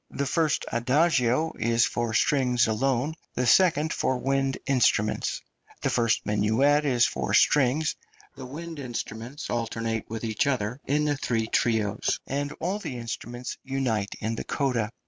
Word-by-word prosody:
The 140 - -3
first 155 +2 +1
adagio 130 +3 +2
is 115 +1 +3
for 120 -1 -2
strings 125 -1 +3
alone, 130 +6 0 0.2
the 125 - 0
second 160 +2 +4
for 130 - 0
wind 135 0 0
instruments; 120 -5 +1 0.4
the - - +1
first 115 -1 +1
minuet 110 +9 +2
is 125 -4 +3
for - - -1
strings, 150 +2 +3 0.4
the 130 - -8
wind 160 +3 -7
instruments 120 +1 -6
alternate 115 -1 -2
with 115 +1 -5
each 110 +3 0
other 125 -1 -1
in 150 +2 +1
the 145 -1 0
three 115 -5 -1
trios, 110 -3 0
and 145 +1 -2
all 190 +5 -3
the 130 -11 -5
instruments 120 +1 -6
unite 125 -7 -1
in 110 +1 -2
the - - -3
coda. 125 -7 -1
125 Hz, 145 wpm, -26 LUFS, 115-145 Hz, 0.4 s, second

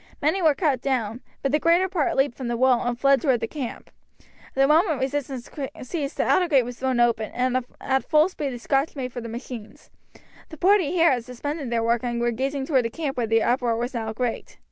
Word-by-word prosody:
Many 315 +6 +1
were 310 -4 +4
cut 285 -8 +1
down, 245 -3 -1 0.2
but 275 - +1
the 300 - +3
greater 340 +4 +3
part 355 -7 0
leapt 270 -2 +1
from 255 - -5
the 235 0 -1
wall 255 -1 +4
and 240 0 -1
fled 275 0 +4
towards 265 -6 +2
the 225 - -1
camp. 265 -2 -6 0.6
The 270 0 +4
moment 315 0 +3
resistance 265 -2 -3 0.4
ceased 285 +1 -4
the - - +2
outer 360 - +3
gate 275 -6 +4
was 245 0 -8
thrown 260 -2 0
open, 230 -2 +2
and 255 +1 +1 0.2
at 265 0 -1
full 310 +1 +5
speed 300 -6 -4
the 245 - -5
Scotch 275 +5 0
made 255 -3 -5
for 245 - -5
the 230 - -7
machines. 235 -2 -9 0.6
The 315 - -10
party 375 -2 +3
here 335 -2 +4
had 245 -3 0
suspended 280 +3 -5
their 230 -1 0
work 235 +1 +1
and 240 -1 -2
were 240 0 +1
gazing 270 +3 -2
towards 270 -3 +3
the - - 0
camp, 285 +2 -4
where 240 -2 -1
the 225 0 +3
uproar 240 -2 +1
was 240 +3 -3
now 225 -2 -3
great. 240 +1 -4
265 Hz, 230 wpm, -24 LUFS, 240-290 Hz, 0.6 s, full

